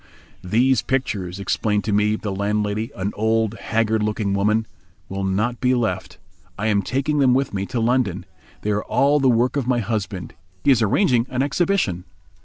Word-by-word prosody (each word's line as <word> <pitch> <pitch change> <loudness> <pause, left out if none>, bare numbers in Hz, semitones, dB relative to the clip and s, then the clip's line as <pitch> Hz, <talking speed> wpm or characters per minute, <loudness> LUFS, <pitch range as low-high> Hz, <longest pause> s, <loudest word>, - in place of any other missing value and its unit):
"These 120 +6 +2
pictures," 100 -8 -2
explained 105 +1 0
to 110 - -2
me 105 +1 +2
the 105 -1 -4
landlady, 105 +2 -1
an 100 +2 -3
old, 110 0 +1
haggard 110 -1 0
looking 105 -1 -1
woman, 105 +3 +1 0.4
"will 95 0 -3
not 105 +6 -1
be 125 0 +3
left, 120 -3 -2 0.4
I 105 - -3
am 105 -2 +2
taking 135 +8 -1
them 130 -3 +4
with 135 -3 0
me 100 0 -2
to 125 -2 -2
London. 120 -4 0 0.4
They 105 - 0
are 105 0 0
all 145 +2 +3
the 135 -2 +3
work 125 +3 +2
of 135 -4 -1
my 125 -1 +2
husband. 100 -5 -3 0.3
He 140 - +5
is 125 -3 +4
arranging 120 - +2
an 130 +1 0
exhibition." 145 - 0
110 Hz, 180 wpm, -22 LUFS, 100-125 Hz, 0.4 s, He